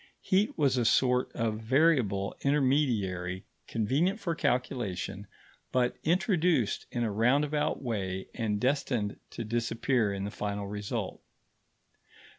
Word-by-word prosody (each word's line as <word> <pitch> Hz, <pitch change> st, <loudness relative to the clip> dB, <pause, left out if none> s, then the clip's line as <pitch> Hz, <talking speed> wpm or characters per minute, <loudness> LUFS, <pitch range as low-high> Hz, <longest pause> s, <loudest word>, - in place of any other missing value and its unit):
Heat 195 Hz, +3 st, +1 dB
was 140 Hz, -4 st, +3 dB
a -, -, +2 dB
sort 125 Hz, +2 st, +3 dB
of 110 Hz, -2 st, -1 dB
variable 120 Hz, -6 st, +2 dB
intermediary 120 Hz, -11 st, +1 dB, 0.2 s
convenient 145 Hz, -, +1 dB
for 175 Hz, -5 st, -1 dB
calculation, 105 Hz, -, -2 dB, 0.4 s
but 125 Hz, -1 st, +1 dB
introduced 175 Hz, -, +1 dB
in 120 Hz, -, -2 dB
a 110 Hz, -, 0 dB
roundabout 140 Hz, +8 st, +1 dB
way 95 Hz, -6 st, -3 dB
and 105 Hz, -2 st, -1 dB
destined 125 Hz, -5 st, 0 dB
to 115 Hz, -, -5 dB
disappear 115 Hz, 0 st, 0 dB
in 100 Hz, 0 st, -3 dB
the 100 Hz, -, -3 dB
final 100 Hz, -1 st, -3 dB
result. 105 Hz, 0 st, -4 dB
120 Hz, 115 wpm, -30 LUFS, 105-140 Hz, 0.4 s, was